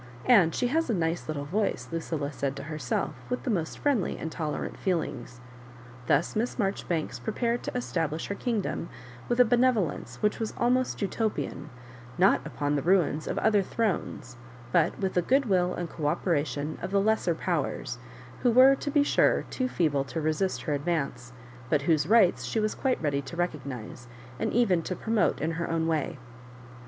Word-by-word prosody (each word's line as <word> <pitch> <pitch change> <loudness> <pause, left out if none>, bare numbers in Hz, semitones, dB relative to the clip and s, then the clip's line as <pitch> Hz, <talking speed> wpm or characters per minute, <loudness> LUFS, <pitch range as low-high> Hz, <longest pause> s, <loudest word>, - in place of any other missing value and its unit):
"And 195 -9 +5
she - - 0
has 325 +1 +1
a 225 - +2
nice 165 -1 -1
little 145 -2 -3
voice." 205 +7 -1
Lucilla 160 -3 -3
said 140 -1 -2
to 140 - -7
herself, 150 -4 -2 0.2
with 250 - -2
the 250 - -1
most 165 -6 -2
friendly 270 -10 0
and 160 - -5
tolerant 155 -3 -3
feelings. 135 -9 -2 0.7
Thus 145 +4 +2
Miss 230 +3 -1
Marjoribanks 195 -6 -2
prepared 235 +2 -1
to - - -4
establish 165 -9 -2
her - - -3
kingdom 210 -5 -2 0.4
with 240 - +1
a 250 - +8
benevolence 220 - +1
which 210 - +2
was 220 -2 -3
almost 250 -2 +1
Utopian, 200 - -2 0.5
not 190 +3 +4
upon 145 0 -1
the 145 - 0
ruins 170 -3 +2
of - - -2
other 210 -2 +3
thrones, 185 - -2 0.3
but 170 +3 +2
with 190 -1 -1
the 180 - +3
good 270 +9 +2
will 180 -4 +2
and 175 - -3
co 155 -2 -3
operation 150 -3 -1
of 185 - -3
the 200 +1 +2
jfesser 200 -5 +1
powers, 145 -7 -2 0.4
who 245 - +4
were, 255 +3 +7
to 275 - -3
be 290 0 +4
sure, - - +3
too 255 - -1
feeble 150 - +1
to 160 - -4
resist 155 +5 -1
her 150 - -1
advance, 145 -5 -2 0.4
but 150 -3 +2
whose 155 -1 +2
rights 210 -4 +4
she 225 - -1
was 215 0 0
quite 265 -2 0
ready 140 -2 +1
to 140 +5 -9
recognise, 135 -9 -4 0.3
and - - 0
even 205 -8 +3
to 185 - -4
pro 225 - -3
mote, 215 - +2
in 160 +2 -1
her 165 +1 -3
own 165 0 0
way. 160 -1 -1
175 Hz, 180 wpm, -28 LUFS, 150-220 Hz, 0.7 s, a